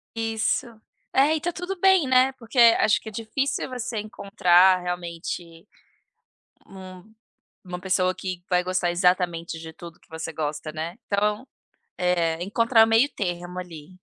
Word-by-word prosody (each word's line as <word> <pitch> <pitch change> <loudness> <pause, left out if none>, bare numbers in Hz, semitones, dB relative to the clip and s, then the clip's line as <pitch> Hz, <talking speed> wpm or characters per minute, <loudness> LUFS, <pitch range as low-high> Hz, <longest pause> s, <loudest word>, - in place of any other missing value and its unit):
Isso. 225 +3 -1 0.5
É, 285 +4 +4
e 315 - -1
tá 350 - -1
tudo 360 +2 -5
bem, 380 -3 +4
né, 260 +1 +4
porque 245 0 -5 0.2
acho 215 - +3
que - - -14
é - - -12
difícil 230 +8 -3
você 245 -3 -4
encontrar 185 -3 +3
realmente 170 -1 -6 1.0
um 185 +2 -12 0.5
uma 180 -2 -7
pessoa 185 0 0
que 185 -1 -6
vai 180 -1 +2
gostar 185 -1 -1
exatamente 175 -2 0
de 160 0 -9
tudo 170 0 -12
que - - -29
você 160 0 -6
gosta, 155 0 -4
né. 160 +3 -5
Então, 210 +4 -1 0.5
eh, 170 -2 0
encontrar 225 +3 +4
o - - -3
meio-termo 180 -7 0
ali. 180 0 -10
185 Hz, 145 wpm, -24 LUFS, 175-225 Hz, 1.0 s, É